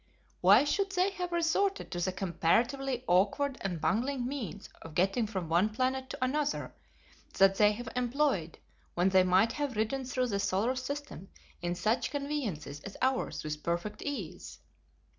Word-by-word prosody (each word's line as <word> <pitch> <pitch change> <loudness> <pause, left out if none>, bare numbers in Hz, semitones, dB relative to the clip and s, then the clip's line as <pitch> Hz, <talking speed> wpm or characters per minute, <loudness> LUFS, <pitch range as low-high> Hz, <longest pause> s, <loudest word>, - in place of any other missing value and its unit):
Why - - +7
should 390 +6 0
they 370 +1 +2
have 360 -2 -4
resorted 345 +4 +1
to 175 - -3
the 185 +2 0
comparatively 235 - 0
awkward 255 +10 +2
and 180 -4 -2
bungling 245 - 0
means 250 - -5
of 165 -2 -10
getting 195 +6 +2
from 190 -5 -4
one 175 +6 +3
planet 260 +3 -1
to - - -4
another 295 +2 -1 0.6
that 195 0 +6
they 210 0 +5
have 235 +2 -7
employed 250 - 0 0.4
when 175 +2 +3
they 190 -1 +5
might 185 +5 +4
have 285 -2 -3
ridden 220 +5 -1
through 255 0 -1
the 200 -2 -1
solar 200 +6 +1
system 270 - -6 0.3
in 175 0 -1
such 215 +7 0
conveyances 265 - -3
as 195 +6 -9
ours 260 0 0
with 150 0 -4
perfect 175 +6 -3
ease?" 285 -1 -5
230 Hz, 160 wpm, -31 LUFS, 185-275 Hz, 0.6 s, Why